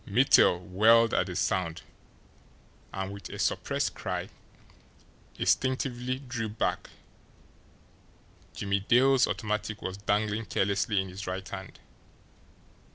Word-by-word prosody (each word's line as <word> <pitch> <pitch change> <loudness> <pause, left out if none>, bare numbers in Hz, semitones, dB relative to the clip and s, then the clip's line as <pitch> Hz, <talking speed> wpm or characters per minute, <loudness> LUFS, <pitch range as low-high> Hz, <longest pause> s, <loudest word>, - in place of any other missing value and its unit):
Mittel 90 - +5
whirled 110 +6 +4
at - - +1
the 90 - -6
sound, 90 -3 -1 1.1
and, 95 0 -4
with 100 - -9
a - - -7
suppressed - - -1
cry, - - -4 1.1
instinctively 130 -1 0
drew 125 -5 -5
back 105 - -2 1.7
Jimmie 100 0 -1
Dale's 130 +6 +4
automatic 110 0 -3
was 95 +1 -4
dangling 105 +2 -1
carelessly 100 +1 0
in 95 0 -2
his 95 +1 -8
right 95 +1 -4
hand. 95 -1 -8
100 Hz, 105 wpm, -28 LUFS, 95-115 Hz, 1.7 s, Mittel